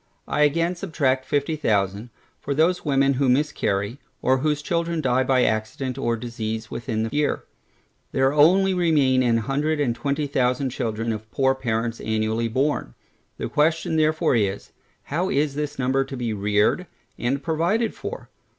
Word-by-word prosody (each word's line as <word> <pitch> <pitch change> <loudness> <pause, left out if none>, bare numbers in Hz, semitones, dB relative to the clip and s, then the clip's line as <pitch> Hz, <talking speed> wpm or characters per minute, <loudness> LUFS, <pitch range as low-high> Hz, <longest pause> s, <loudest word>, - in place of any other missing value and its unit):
I 150 - 0
again 165 +4 +2
subtract 140 -8 0
fifty 145 +2 0
thousand, 105 -5 0 0.3
for 140 - -3
those 170 +4 +2
women 140 -2 +2
who 135 0 +1
miscarry, 125 -5 0 0.2
or 130 +1 +2
whose 150 +1 0
children 170 0 -1
die 130 -3 +2
by 130 -1 +3
accident 110 +4 -1
or 120 -3 0
disease 110 -2 -5
within 115 -2 -2
the 115 - -3
year. 150 0 0 0.7
There 135 +1 +2
only 185 +6 +5
remain 150 -8 +3
a 120 -2 +2
hundred 145 +7 -1
and 125 -5 +1
twenty 140 +3 -1
thousand 130 -1 0
children 115 -2 -2
of 110 0 -8
poor 135 +2 +2
parents 115 -3 -2
annually 110 +1 0
born. 130 - -1 0.4
The - - -3
question 160 +1 +1
therefore 155 -3 +2
is, 100 -3 -1 0.3
How 175 +6 -1
this 150 -3 -1
number 135 +1 +1
shall 135 - -5
be 120 -3 -2
reared 105 - +1 0.3
and 135 +3 -1
provided 170 +9 0
for? - - -7
135 Hz, 155 wpm, -23 LUFS, 115-150 Hz, 0.7 s, only